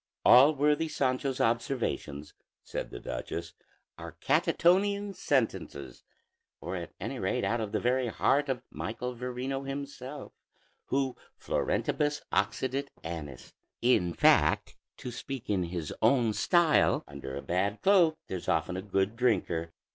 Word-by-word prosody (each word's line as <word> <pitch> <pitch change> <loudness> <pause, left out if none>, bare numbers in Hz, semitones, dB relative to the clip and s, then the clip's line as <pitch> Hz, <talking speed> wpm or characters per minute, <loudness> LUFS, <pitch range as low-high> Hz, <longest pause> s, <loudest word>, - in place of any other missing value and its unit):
"All 140 +5 +8
worthy 150 +3 +2
Sancho's 130 -2 -1
observations," 115 - -1 0.3
said - - -5
the - - -8
duchess, 85 +8 -5 0.5
"are - - -8
Catonian 200 +3 +2
sentences, 105 - -2 0.6
or 95 - -5
at 85 -2 -7
any - - -4
rate - - -1
out 120 0 0
of 105 -2 -4
the - - 0
very 125 +1 +1
heart 140 +5 +1
of 125 -2 -2
Michael 125 +3 -4
Verino 125 +2 -3
himself, 135 0 -6 0.6
who 135 -1 0 0.2
florentibus 145 0 -1
occidit 135 +2 0 0.2
annis. 80 -6 -7 0.3
In 90 -9 +3
fact, - - +3 0.2
to 125 - -6
speak 130 -1 -6
in 95 -3 +1
his 85 -3 -4
own 115 -1 +3
style, 175 - +3
'Under 65 0 -7
a 70 - -6
bad 100 +4 0
cloak 180 -5 +5
there's 95 -2 -6
often 80 +3 0
a 95 - -3
good 95 +2 0
drinker.'" 85 -9 0
125 Hz, 130 wpm, -29 LUFS, 90-140 Hz, 0.6 s, All